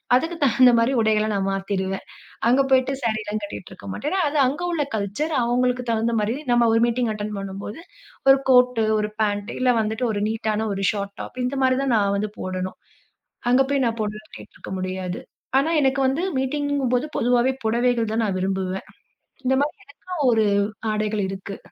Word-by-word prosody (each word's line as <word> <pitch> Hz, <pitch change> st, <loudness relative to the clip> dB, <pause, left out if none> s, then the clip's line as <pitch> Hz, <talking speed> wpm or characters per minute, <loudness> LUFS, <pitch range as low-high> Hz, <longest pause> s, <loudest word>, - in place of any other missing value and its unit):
அதுக்கு 325 Hz, +7 st, 0 dB
தகுந்த 255 Hz, -1 st, +6 dB
மாதிரி 230 Hz, +3 st, +2 dB
உடைகள 215 Hz, -1 st, +2 dB
நான் 195 Hz, -1 st, 0 dB
மாத்திடுவேன். 195 Hz, -1 st, -2 dB, 0.4 s
அங்க 255 Hz, +3 st, +5 dB
போய்ட்டு 265 Hz, 0 st, +3 dB
சாரீலாம் 215 Hz, -2 st, -1 dB
கட்டிகிட்டு 200 Hz, -2 st, -7 dB
இருக்க 190 Hz, -, -11 dB
மாட்டேன். 295 Hz, -, -3 dB
ஏன்னா, 385 Hz, -, +1 dB
அது 300 Hz, -, -2 dB
அங்க 285 Hz, +6 st, -3 dB
உள்ள 320 Hz, -4 st, 0 dB
கல்ச்சர் 220 Hz, +10 st, -2 dB
அவங்களுக்கு 250 Hz, +1 st, +1 dB
தகுந்த 230 Hz, +1 st, 0 dB
மாதிரி 210 Hz, +3 st, 0 dB, 0.2 s
நம்ப 240 Hz, -1 st, +4 dB
ஒரு 225 Hz, -, +4 dB
மீட்டிங் 240 Hz, 0 st, 0 dB
அட்டெண்ட் 210 Hz, 0 st, -4 dB
பண்ணும்போது 195 Hz, +5 st, -6 dB, 0.5 s
ஒரு 270 Hz, -, +8 dB
கோட்டு, 250 Hz, -2 st, +5 dB, 0.2 s
ஒரு 210 Hz, 0 st, -1 dB
பேண்ட் 205 Hz, 0 st, 0 dB
இல்ல 255 Hz, 0 st, +4 dB
வந்துட்டு 220 Hz, +3 st, -1 dB
ஒரு 205 Hz, -1 st, -2 dB
நீட்டான 220 Hz, 0 st, -1 dB
ஒரு 195 Hz, 0 st, -3 dB
ஷார்ட் 200 Hz, -1 st, -5 dB
டாப், 255 Hz, -, -8 dB
இந்த 265 Hz, +2 st, -2 dB
மாதிரி 255 Hz, 0 st, +3 dB
தான் 265 Hz, -3 st, +1 dB
நான் 200 Hz, -1 st, +2 dB
வந்து 210 Hz, +1 st, -2 dB
போடணும். 185 Hz, 0 st, -4 dB, 0.7 s
அங்க 255 Hz, +2 st, +5 dB
போய் 280 Hz, -2 st, +2 dB
நான் 230 Hz, 0 st, -1 dB
போடுறது 215 Hz, 0 st, -5 dB
கேட்டிருக்க -, -, -11 dB
முடியாது. 185 Hz, -1 st, -4 dB, 0.4 s
ஆனா, 290 Hz, +4 st, +1 dB
எனக்கு 270 Hz, 0 st, +2 dB
வந்து 285 Hz, +7 st, 0 dB, 0.2 s
மீட்டிங்கங்கும்போது 280 Hz, -1 st, 0 dB
பொதுவாவே 245 Hz, +2 st, +3 dB
புடவைகள் 235 Hz, 0 st, +1 dB
தான் 230 Hz, -, +1 dB
நான் 195 Hz, -2 st, -1 dB
விரும்புவேன். 190 Hz, 0 st, -2 dB, 0.6 s
இந்த 265 Hz, +1 st, +3 dB
மாதிரி 295 Hz, +2 st, -2 dB, 0.3 s
எனக்கும் 305 Hz, -9 st, +1 dB
ஒரு 220 Hz, -1 st, +3 dB, 0.5 s
ஆடைகள் 215 Hz, -1 st, -1 dB
இருக்கு. 195 Hz, +1 st, -6 dB
225 Hz, 175 wpm, -23 LUFS, 205-255 Hz, 0.7 s, ஒரு